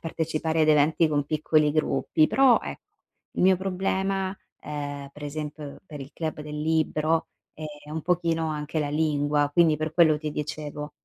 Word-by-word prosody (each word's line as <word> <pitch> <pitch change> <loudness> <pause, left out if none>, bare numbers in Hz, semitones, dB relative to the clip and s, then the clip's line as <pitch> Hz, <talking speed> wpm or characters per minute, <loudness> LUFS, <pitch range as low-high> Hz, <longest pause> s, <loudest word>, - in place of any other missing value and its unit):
partecipare 160 0 -1
ad 155 - +2
eventi 155 +2 +4
con 145 -2 0
piccoli 155 0 +2
gruppi. 155 +1 +2
Però 265 -3 +5
ecco, - - -7 0.5
il - - +1
mio 190 0 +5
problema, 190 +1 -1 0.2
ehm, 145 -1 -5
per 150 - -13
esempio 150 0 -6
per 150 -2 -9
il 135 +2 -9
club 155 -2 -4
del 150 0 -6
libro 160 0 +1 0.2
è 155 - -9 0.2
è - - -11
un 160 0 -4
pochino 165 -2 0
anche 150 +1 -3
la 145 - -1
lingua, 145 -1 +1
quindi 165 -2 +4
per 155 0 -3
quello 160 -3 +5
ti 155 -1 -4
dicevo. 150 0 -5
155 Hz, 170 wpm, -26 LUFS, 150-165 Hz, 0.5 s, Però